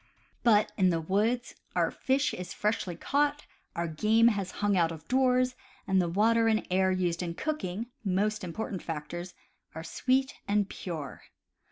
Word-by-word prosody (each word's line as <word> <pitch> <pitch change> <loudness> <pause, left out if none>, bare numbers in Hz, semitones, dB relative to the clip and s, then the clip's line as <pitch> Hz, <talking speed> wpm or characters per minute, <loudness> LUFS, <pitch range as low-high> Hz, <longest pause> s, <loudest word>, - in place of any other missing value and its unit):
But, 215 -3 +4
in 185 -3 +4
the 165 -2 +1
woods, 215 +9 0 0.2
our - - +2
fish 270 +2 0
is 180 +1 -6
freshly 210 -4 -1
caught, 290 - 0 0.3
our 170 0 -1
game 215 +8 +4
has 200 -4 -2
hung 205 -1 +2
out 165 -2 +3
of 160 -1 -9
doors, 255 0 +3 0.3
and 190 -1 +3
the 175 - -1
water 225 +5 +3
and 220 -1 +2
air 190 0 +3
used 180 -2 0
in 170 -2 -3
cooking 230 - -3 0.2
(most 210 +2 0
important 185 +2 -4
factors) 170 +3 -6 0.4
are 160 - -5
sweet 265 +8 0
and 205 -1 +2
pure. 160 -8 -6
200 Hz, 160 wpm, -29 LUFS, 175-230 Hz, 0.4 s, But